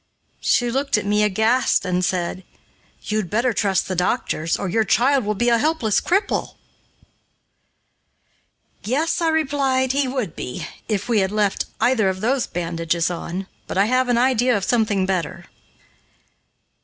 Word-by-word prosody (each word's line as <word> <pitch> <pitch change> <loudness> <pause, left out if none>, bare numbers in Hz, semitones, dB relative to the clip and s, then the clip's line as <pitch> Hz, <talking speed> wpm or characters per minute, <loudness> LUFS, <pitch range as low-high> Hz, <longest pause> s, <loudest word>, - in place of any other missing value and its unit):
She 240 -1 +1
looked 275 -1 +1
at 210 - -3
me 210 +1 +2
aghast 220 +4 +2
and 180 0 0
said, 180 +1 -2 0.6
"You'd 215 -4 -2
better 235 +3 +1
trust 195 -4 0
the 185 - -3
doctors, 180 -3 0
or 195 - -3
your 220 +5 +1
child 260 +3 +2
will 210 0 -1
be 240 +4 +1
a 235 -1 +3
helpless 295 -8 +1
cripple." 390 +4 0 2.3
"Yes," 300 +10 0
I 335 - +2
replied, 275 -4 +1
"he 275 0 +1
would 255 - -3
be, 125 - -5 0.2
if 205 -2 -1
we 230 -3 +2
had 190 0 0
left 210 -2 0
either 230 -6 +2
of 190 0 -3
those 250 +3 +1
bandages 165 0 -1
on, 175 +2 -5 0.2
but - - -4
I 195 - +4
have 255 +2 +1
an 240 - +3
idea 250 -1 +3
of 195 - -4
something 215 -5 +1
better." 185 -4 -3
220 Hz, 155 wpm, -21 LUFS, 190-255 Hz, 2.3 s, I